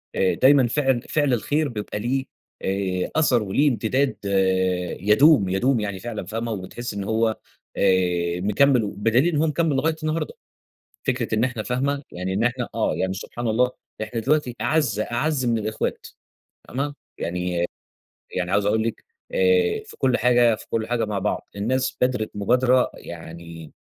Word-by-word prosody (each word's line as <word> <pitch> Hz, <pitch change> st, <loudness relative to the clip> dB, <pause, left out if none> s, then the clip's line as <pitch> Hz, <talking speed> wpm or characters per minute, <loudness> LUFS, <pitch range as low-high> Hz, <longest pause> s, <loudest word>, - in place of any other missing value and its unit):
آآ، 95 Hz, -, +2 dB
دايمًا 135 Hz, -2 st, +5 dB
فِعل 135 Hz, -2 st, +1 dB
فِعل 145 Hz, -2 st, +1 dB
الخير 145 Hz, +6 st, 0 dB
بيبقى 105 Hz, -3 st, -5 dB
ليه 130 Hz, +5 st, -1 dB, 0.4 s
آآ، 95 Hz, -1 st, -1 dB
أثَر 130 Hz, -8 st, +3 dB
وليه 140 Hz, +9 st, +2 dB
امتداد 130 Hz, +2 st, 0 dB
آآ 95 Hz, -2 st, +1 dB
يدوم، 105 Hz, -, +5 dB
يدوم 120 Hz, +6 st, +2 dB
يعني 100 Hz, -2 st, -3 dB
فعلًا 110 Hz, -3 st, -5 dB
فاهمة، 115 Hz, +3 st, -3 dB
وبتحسّي 105 Hz, +3 st, -5 dB
إن 100 Hz, -, -3 dB
هو 110 Hz, +2 st, +1 dB, 0.4 s
آآ، 90 Hz, -1 st, +2 dB
مكمّل 125 Hz, +5 st, +3 dB
و 105 Hz, -, -2 dB
بدليل 115 Hz, -, +2 dB
إن -, -, +1 dB
هو 160 Hz, -, +2 dB
مكمّل 155 Hz, -1 st, +1 dB
لغاية 160 Hz, +4 st, +1 dB
النهارده، 155 Hz, -, -2 dB, 0.7 s
فكرة 120 Hz, -3 st, 0 dB
إن 110 Hz, -, +2 dB
إحنا 125 Hz, -4 st, -1 dB
فاهمة، 140 Hz, +3 st, -1 dB
يعني 90 Hz, +1 st, -3 dB
إن 100 Hz, +4 st, 0 dB
إحنا 120 Hz, 0 st, -1 dB
آه، 115 Hz, -, +1 dB
يعني 95 Hz, 0 st, -1 dB
سبحان 120 Hz, +4 st, -5 dB
الله 125 Hz, +3 st, +2 dB, 0.3 s
إحنا 110 Hz, +2 st, -4 dB
دلوقتي 135 Hz, -1 st, +1 dB
أعز، 120 Hz, -4 st, +1 dB
أعز 130 Hz, +4 st, 0 dB
من 115 Hz, -1 st, +2 dB
الإخوات 110 Hz, 0 st, -3 dB, 0.6 s
فاهمة، 140 Hz, +3 st, -3 dB, 0.2 s
يعني، 90 Hz, 0 st, -1 dB, 0.7 s
يعني 90 Hz, 0 st, -2 dB
عاوز 100 Hz, 0 st, +2 dB
أقول 110 Hz, +1 st, +2 dB
لِك 115 Hz, -, -3 dB, 0.3 s
آآ، 460 Hz, -3 st, +3 dB
في -, -, -12 dB
كُلّ 130 Hz, -2 st, +2 dB
حاجة 120 Hz, -1 st, +4 dB
في -, -, -10 dB
كُلّ 110 Hz, -1 st, -1 dB
حاجة 120 Hz, -2 st, +1 dB
مع 105 Hz, -1 st, -2 dB
بعض، -, -, -2 dB
الناس 130 Hz, +6 st, 0 dB
بادرت 125 Hz, -4 st, +1 dB
مبادرة 125 Hz, +5 st, +3 dB
يعني 85 Hz, -1 st, -10 dB
115 Hz, 165 wpm, -23 LUFS, 100-135 Hz, 0.7 s, دايمًا